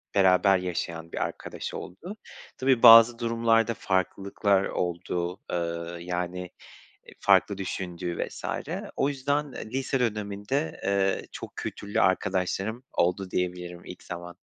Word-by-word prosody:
beraber 95 0 +5
yaşayan 85 -2 -4
bir - - -6
arkadaş - - -4
oldu. 175 - -8 0.4
Tabii, 130 -2 +2
bazı 115 0 +10
durumlarda 115 0 +2
farklılıklar 95 0 0
oldu. 90 0 -3
Eee, 85 0 -3
yani, 90 0 -3 0.7
eee, - - -14
farklı 100 -2 +4
düşündüğü 90 -2 -4
vs. - - -11 0.5
O 135 - +2
yüzden, 145 +1 -1
eee, - - -7
lise 135 +1 -1
döneminde, 105 +5 -2
eee, 95 0 +1
çok - - -9
kültürlü 100 0 -3
arkadaşlarım 95 +4 0
oldu 90 +2 0
diyebilirim 90 -1 -3
ilk 90 - -10
zaman. 85 0 -8
95 Hz, 120 wpm, -27 LUFS, 90-115 Hz, 0.7 s, bazı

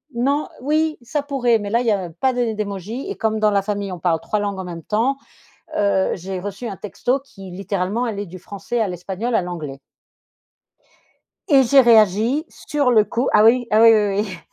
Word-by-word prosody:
non, 280 +5 0
oui, 310 +3 0
ça 290 +5 -2
pourrait 250 -5 +1
mais 205 - -5
là, 235 +3 +2
il - - -4
y - - +4
a 190 -4 -1
pas 255 +11 -1
des 240 -3 -1
d'émoji 210 - -5
et 400 - -4
comme 220 -1 -1
dans 215 -1 +3
la 200 - +2
famille, 200 -1 -3
on 180 - -6
parle 165 -2 +1
3 210 - -2
langues 200 -1 -3
en - - -4
même 170 -2 -7
temps, 235 - 0 0.6
heu, 200 -2 +1
j'ai 190 +1 -6
reçu 205 +4 -6
un 195 - -6
texto 245 +7 -2
qui, 195 -8 -13
littéralement, 195 +4 -2
allait 205 -3 -4
du 185 +2 -10
français 200 +6 -5
à 220 - +2
l'espagnol, 190 +7 -4
à 190 - +3
l'anglais. 155 -6 -6 1.7
Et 275 -3 +6
j'ai 270 +3 +6
réagi 230 - +4
sur 285 -4 -1
le 215 -3 +5
coup 240 +4 -1
ah 210 - +5
oui, 240 +2 +4
ah 215 - +4
oui, 230 - +9
oui, 205 -2 +2
oui. 185 -4 -8
215 Hz, 205 wpm, -20 LUFS, 195-245 Hz, 1.7 s, oui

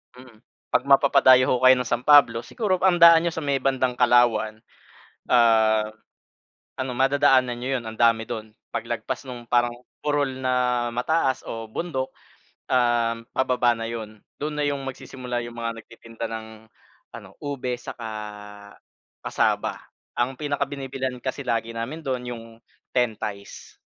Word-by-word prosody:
Mm, 125 -3 -15 0.3
pag - - +1
mapapadayo 130 -2 +5
ho 125 - +3
kayo 130 0 +8
ng 125 -2 -2
San 120 +1 -1
Pablo 130 -6 +5
siguro 210 -6 -1
ang 175 -2 +3
daan 170 0 +8
niyo 170 - -1
sa 160 - -4
may 140 -1 0
bandang 130 -2 0
Kalawan. 115 -3 +3 0.7
Ah, 110 -2 +4 0.8
ano 130 -1 -3
madadaanan 135 -2 +3
niyo 130 +2 -1
'yon 120 - -8
ang 110 - -10
dami 115 -1 +3
do'n. 110 -1 -6 0.2
Paglagpas 115 +3 -4
nung 120 -2 -8
parang 120 0 +2 0.3
burol 140 -3 -1
na 125 -1 +1
mataas 135 +2 0
o 115 -1 -6
bundok, 130 -1 -3 0.6
um, 120 -2 +1
pababa 125 -2 +2
na 115 0 -5
'yon. 110 -2 -8 0.2
Do'n 150 +1 -3
na - - +1
'yong 140 -1 -1
magsisimula 125 -2 -5
'yong 120 0 -9
mga 115 -1 -5
nagtitinda 115 0 -9
ng 110 0 -6 0.7
ano - - -11
ube 130 -3 -3
saka 115 -1 -8 1.2
cassava. - - 0 0.4
Ang 130 +2 0
pinakabinibilhan 135 -3 -3
kasi 135 +1 -4
lagi 115 0 -1
namin 120 +8 -4
do'n 130 -2 -2
'yong 115 -1 -8 0.5
Ten 125 -3 +2
Tays. 100 -1 -7
125 Hz, 145 wpm, -24 LUFS, 115-135 Hz, 1.2 s, kayo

